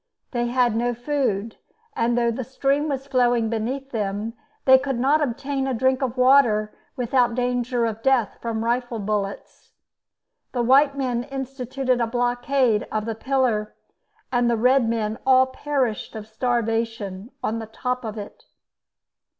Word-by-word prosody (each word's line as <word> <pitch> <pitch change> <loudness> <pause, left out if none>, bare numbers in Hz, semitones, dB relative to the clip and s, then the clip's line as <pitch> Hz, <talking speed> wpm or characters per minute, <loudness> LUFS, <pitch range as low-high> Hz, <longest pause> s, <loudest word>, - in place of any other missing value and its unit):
They 240 -1 -1
had 240 -2 +2
no 240 +1 0
food, 240 -5 -1 0.4
and 235 +1 +1
though 235 -1 +2
the 255 +3 -4
stream 275 +4 0
was 270 -1 -3
flowing 245 -4 +2
beneath 260 +5 -3
them, 210 0 -2 0.3
they 260 0 +8
could 270 -2 -2
not 280 +5 +3
obtain 275 0 -2
a 265 - -1
drink 260 +3 +1
of 255 -1 -2
water 250 -5 +4 0.2
without 245 -1 +1
danger 245 -1 0
of 225 -1 -3
death 255 -4 +1
from 225 -1 -2
rifle 240 0 -1
bullets. 205 -1 -4 0.8
The 245 -2 0
white 275 +3 +4
men 250 -3 -1
instituted 265 -2 -2
a 230 - +1
blockade 245 -1 +1
of 215 -1 -1
the 225 - -2
pillar, 230 -3 0 0.6
and 245 -1 +2
the 235 - +2
red 250 +1 +3
men 220 -1 -1
all 260 -1 +5
perished 260 -5 -2
of 215 -1 -6
starvation 225 -3 -2
on 225 +1 -1
the 225 - -6
top 250 +3 -3
of 220 -1 -5
it. 205 -1 -9
245 Hz, 150 wpm, -23 LUFS, 225-265 Hz, 0.8 s, they